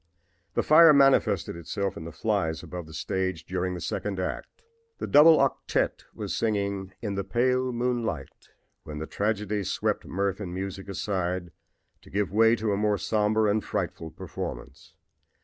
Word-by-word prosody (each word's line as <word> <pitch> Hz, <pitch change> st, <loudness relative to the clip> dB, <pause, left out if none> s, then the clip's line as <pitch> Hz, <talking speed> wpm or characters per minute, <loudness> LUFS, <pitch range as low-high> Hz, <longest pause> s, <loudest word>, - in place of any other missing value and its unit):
"The -, -, +2 dB
fire 155 Hz, 0 st, +8 dB
manifested 130 Hz, -, +3 dB
itself 95 Hz, +3 st, -3 dB
in 80 Hz, -, -7 dB
the 85 Hz, -, -6 dB
flies 80 Hz, -4 st, -1 dB
above 90 Hz, -1 st, -7 dB
the 80 Hz, -, -12 dB
stage 95 Hz, -4 st, -2 dB
during 90 Hz, 0 st, -2 dB
the -, -, -5 dB
second 95 Hz, +3 st, -3 dB
act. 95 Hz, -, -5 dB, 0.3 s
The -, -, -4 dB
double 155 Hz, +2 st, +7 dB
octette -, -, 0 dB
was -, -, -4 dB
singing 100 Hz, -3 st, -1 dB
'In 105 Hz, -3 st, -2 dB
the 100 Hz, 0 st, -2 dB
Pale 125 Hz, +6 st, +1 dB
Moonlight' 120 Hz, -, -3 dB, 0.3 s
when 75 Hz, -1 st, -8 dB
the 80 Hz, -, -4 dB
tragedy 105 Hz, +1 st, -1 dB
swept -, -, -1 dB
mirth 100 Hz, +1 st, -1 dB
and 90 Hz, -4 st, -5 dB
music 95 Hz, +1 st, -5 dB
aside, 90 Hz, -3 st, -2 dB, 0.5 s
to -, -, -17 dB
give 100 Hz, 0 st, -1 dB
way 115 Hz, +2 st, +5 dB
to 110 Hz, -2 st, -1 dB
a -, -, 0 dB
more 105 Hz, 0 st, +1 dB
somber 110 Hz, +1 st, +1 dB
and 105 Hz, +1 st, +1 dB
frightful 85 Hz, -5 st, -3 dB
performance. -, -, -8 dB
100 Hz, 160 wpm, -27 LUFS, 90-110 Hz, 0.5 s, fire